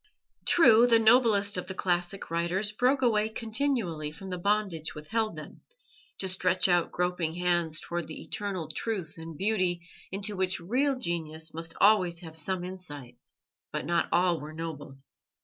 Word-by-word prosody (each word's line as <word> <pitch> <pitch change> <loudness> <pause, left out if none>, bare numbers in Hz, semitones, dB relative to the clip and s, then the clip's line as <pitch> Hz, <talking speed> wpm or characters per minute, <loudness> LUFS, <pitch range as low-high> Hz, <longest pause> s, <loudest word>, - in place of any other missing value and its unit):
True, 240 -8 +6
the 230 -1 +6
noblest 220 -4 +4
of 180 - -4
the 190 - -6
classical 175 +1 -1
writers 180 +5 0
broke 255 +5 +1
away 215 -3 +3
continually 220 - -1
from 190 +4 -9
the 180 - -3
bondage 195 -5 -1
which 150 0 -10
held 220 -1 0
them, - - -10 0.6
to 190 - -1
stretch 185 0 +2
out 175 -2 +2
groping 180 -2 -1
hands 175 -3 +1
towards 170 -1 -4
the 155 - -8
eternal 195 -6 -4
truth 165 0 -4
and 165 -1 -8
beauty 185 -4 0 0.2
into 200 +2 -3
which 185 0 -1
real 260 +10 0
genius 160 -7 -3
must 165 +1 -4
always 185 -5 +4
have 160 -2 -10
some 175 +3 -1
insight, 145 -10 -6 0.5
but - - -3
not 170 0 +1
all 175 -1 +3
were 150 +2 -8
noble. 155 -4 -7
180 Hz, 160 wpm, -28 LUFS, 165-210 Hz, 0.6 s, True